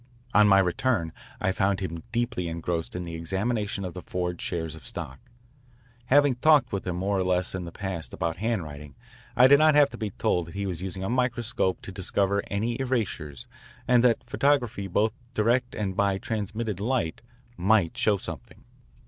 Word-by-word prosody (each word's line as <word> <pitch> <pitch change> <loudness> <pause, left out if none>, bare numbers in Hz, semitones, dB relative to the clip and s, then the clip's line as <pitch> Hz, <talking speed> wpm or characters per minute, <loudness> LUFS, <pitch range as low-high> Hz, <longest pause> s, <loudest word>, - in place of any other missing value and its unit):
On 105 0 +6
my 100 -1 +6
return 95 -1 +1 0.3
I 95 - +1
found 95 0 +1
him 85 -4 -4
deeply 120 -6 -1
engrossed 85 0 -3
in 90 - -3
the 85 -1 -7
examination 100 +4 -1
of 90 - -5
the 90 - -7
forged 90 -1 -3
shares 80 -3 -3
of 80 -3 -11
stock. 65 - -6 0.9
Having 145 -2 +4
talked 145 -2 +4
with 95 -1 -3
him 90 - -1
more 95 +2 0
or - - +1
less 90 0 0
in 95 -2 -4
the 85 - -7
past 95 -3 -5
about 85 -1 -2
handwriting 75 - -3 0.4
I 125 - +7
did 140 +2 +7
not 155 -1 +5
have 145 -1 +5
to - - -9
be 110 -2 -2
told 90 -3 0
that 85 - -10
he 100 0 -2
was 90 -3 -3
using 95 0 -4
a - - -2
microscope 120 -6 0
to - - -7
discover 100 +1 0
any 115 +5 -2
erasures 95 - -2 0.4
and 125 -1 +5
that 120 -2 +3
photography 125 -7 +1
both 105 +4 +1 0.2
direct 120 +3 +1
and 95 -3 -2
by 100 -1 +2
transmitted 105 -1 -3
light 115 -6 -1 0.3
might 100 -3 +2
show 105 -2 +2
something. - - -8
100 Hz, 180 wpm, -27 LUFS, 90-120 Hz, 0.9 s, I